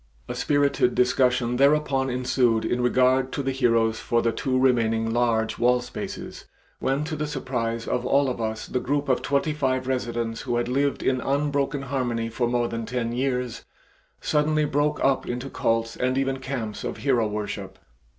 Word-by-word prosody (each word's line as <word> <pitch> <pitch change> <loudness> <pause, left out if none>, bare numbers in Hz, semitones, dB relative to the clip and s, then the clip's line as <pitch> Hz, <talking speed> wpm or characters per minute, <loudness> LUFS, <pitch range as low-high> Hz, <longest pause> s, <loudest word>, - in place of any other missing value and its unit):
A - - -4
spirited 140 -4 +1
discussion 125 -1 +2
thereupon 140 -1 +3
ensued 125 -2 +1
in 125 - 0
regard 130 +1 +3
to 140 - -2
the 135 - 0
heroes 115 -4 +2
for 115 0 0
the 115 - +2
two 130 +2 -1
remaining 115 -3 +2
large 115 -2 +1
wall 125 +1 +4
spaces, 125 - -7 0.3
when 135 +2 0
to 155 +1 -4
the 150 0 -2
surprise 120 -5 -3
of 125 - -1
all 140 +2 +3
of 125 -2 -3
us 110 0 -3
the 125 - -2
group 145 +2 -1
of 130 - +2
twenty 140 +2 0
five 130 -3 0
residents 120 -3 -2
who 120 - -2
had 120 - 0
lived 140 +2 0
in 130 -1 +1
unbroken 140 0 0
harmony 125 -4 -2
for 120 +1 -1
more 120 0 +1
than 115 -1 -4
ten 120 -2 -2
years, 125 -1 -2 0.6
suddenly 150 0 +1
broke 145 +1 0
up 135 -1 +2
into 125 +2 -4
cults 115 0 0
and 130 +1 0
even 135 0 0
camps 125 -6 -4
of - - -4
hero 125 -6 +1
worship. 105 -2 -5
125 Hz, 175 wpm, -25 LUFS, 115-135 Hz, 0.6 s, wall